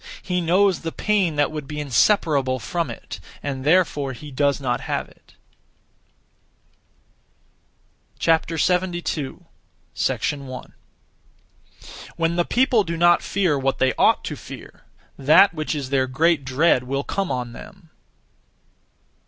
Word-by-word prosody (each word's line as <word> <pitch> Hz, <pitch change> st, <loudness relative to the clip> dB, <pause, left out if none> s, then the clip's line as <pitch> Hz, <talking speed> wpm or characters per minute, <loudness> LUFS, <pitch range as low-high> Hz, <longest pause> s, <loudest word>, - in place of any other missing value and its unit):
He 180 Hz, -2 st, -1 dB
knows 185 Hz, +3 st, +3 dB
the 165 Hz, -, -5 dB
pain 195 Hz, -6 st, 0 dB
that 145 Hz, 0 st, +1 dB
would 150 Hz, -3 st, -6 dB
be 150 Hz, +1 st, -5 dB
inseparable 140 Hz, -, +2 dB
from 165 Hz, -, -3 dB
it, -, -, -8 dB, 0.2 s
and 135 Hz, -2 st, -4 dB
therefore 150 Hz, -4 st, +2 dB
he 150 Hz, +3 st, -10 dB
does 140 Hz, +1 st, +1 dB
not 125 Hz, -3 st, -2 dB
have -, -, -3 dB
it. -, -, -24 dB, 2.9 s
72. 170 Hz, -2 st, 0 dB, 0.5 s
1. 135 Hz, -3 st, -3 dB, 1.4 s
When 165 Hz, 0 st, 0 dB
the 175 Hz, -, +2 dB
people 245 Hz, -3 st, +2 dB
do 170 Hz, -2 st, -4 dB
not 175 Hz, +1 st, +4 dB
fear 180 Hz, -7 st, 0 dB
what 135 Hz, 0 st, 0 dB
they 130 Hz, 0 st, +2 dB
ought -, -, +3 dB
to -, -, -4 dB
fear, -, -, -12 dB, 0.3 s
that 155 Hz, +8 st, +6 dB
which 155 Hz, -1 st, -3 dB
is 140 Hz, -3 st, -5 dB
their 130 Hz, -1 st, +2 dB
great 155 Hz, +2 st, +1 dB
dread 130 Hz, 0 st, +2 dB
will 135 Hz, +2 st, -2 dB
come 195 Hz, +3 st, -2 dB
on 125 Hz, -2 st, -3 dB
them. 190 Hz, -, -13 dB
155 Hz, 125 wpm, -22 LUFS, 135-175 Hz, 2.9 s, that